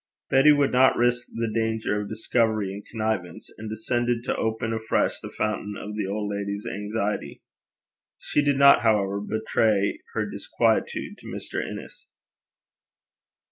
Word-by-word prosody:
Betty 135 Hz, +3 st, +7 dB
would 145 Hz, -1 st, +3 dB
not 130 Hz, +1 st, +5 dB
risk 120 Hz, 0 st, +2 dB
the 115 Hz, 0 st, -2 dB
danger 110 Hz, -1 st, -1 dB
of 100 Hz, -, -6 dB
discovery 110 Hz, -2 st, 0 dB
in 100 Hz, -, -7 dB
connivance, 110 Hz, -6 st, -4 dB
and 110 Hz, 0 st, -6 dB
descended 120 Hz, +2 st, -1 dB
to 125 Hz, -, -1 dB
open 110 Hz, 0 st, -1 dB
afresh 110 Hz, 0 st, 0 dB
the -, -, -8 dB
fountain 105 Hz, -1 st, -2 dB
of 105 Hz, 0 st, -6 dB
the 105 Hz, -, -2 dB
old 105 Hz, +1 st, -2 dB
lady's 100 Hz, 0 st, -4 dB
anxiety. 105 Hz, +1 st, -3 dB, 0.7 s
She 145 Hz, -, 0 dB
did 145 Hz, -1 st, +2 dB
not, 140 Hz, 0 st, +7 dB
however, 100 Hz, -3 st, +2 dB
betray 110 Hz, -1 st, +1 dB, 0.2 s
her -, -, 0 dB
disquietude -, -, -1 dB
to -, -, -12 dB
Mr. -, -, -4 dB
Innes. -, -, -9 dB
110 Hz, 140 wpm, -25 LUFS, 105-120 Hz, 0.7 s, Betty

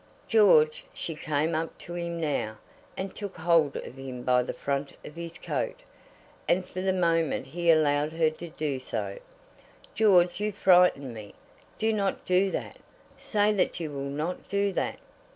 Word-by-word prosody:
"George," 180 Hz, -9 st, +5 dB
she 165 Hz, -, -4 dB
came 155 Hz, +1 st, -1 dB
up 160 Hz, +1 st, -2 dB
to 175 Hz, -, -9 dB
him 170 Hz, -1 st, -3 dB
now, 140 Hz, -9 st, -2 dB, 0.4 s
and 190 Hz, 0 st, -4 dB
took 200 Hz, -3 st, -6 dB
hold 160 Hz, -4 st, +3 dB
of 130 Hz, -, -7 dB
him 130 Hz, -2 st, -7 dB
by 125 Hz, 0 st, +4 dB
the 125 Hz, -, -3 dB
front 140 Hz, 0 st, -3 dB
of 150 Hz, -, -10 dB
his 170 Hz, 0 st, -7 dB
coat, -, -, -3 dB, 0.7 s
and 180 Hz, +1 st, +2 dB
for 185 Hz, -, -6 dB
the 190 Hz, 0 st, +1 dB
moment 165 Hz, -6 st, +1 dB
he 170 Hz, +5 st, -2 dB
allowed 150 Hz, -2 st, +4 dB
her 160 Hz, -1 st, +2 dB
to 170 Hz, +2 st, -9 dB
do 150 Hz, -4 st, -3 dB
so, 100 Hz, -6 st, -4 dB, 0.7 s
"George, 185 Hz, -4 st, +4 dB
you 210 Hz, 0 st, 0 dB
frighten 180 Hz, -, +4 dB
me. 105 Hz, -2 st, -10 dB, 0.4 s
Do 220 Hz, 0 st, +1 dB
not 200 Hz, -3 st, -1 dB
do 185 Hz, +2 st, +3 dB
that. -, -, -5 dB, 0.4 s
Say 210 Hz, -1 st, +1 dB
that 195 Hz, -2 st, 0 dB
you 160 Hz, -3 st, -4 dB
will 140 Hz, -1 st, -5 dB
not 155 Hz, +6 st, -4 dB
do 200 Hz, 0 st, +1 dB
that!" -, -, -2 dB
165 Hz, 170 wpm, -28 LUFS, 145-185 Hz, 0.7 s, George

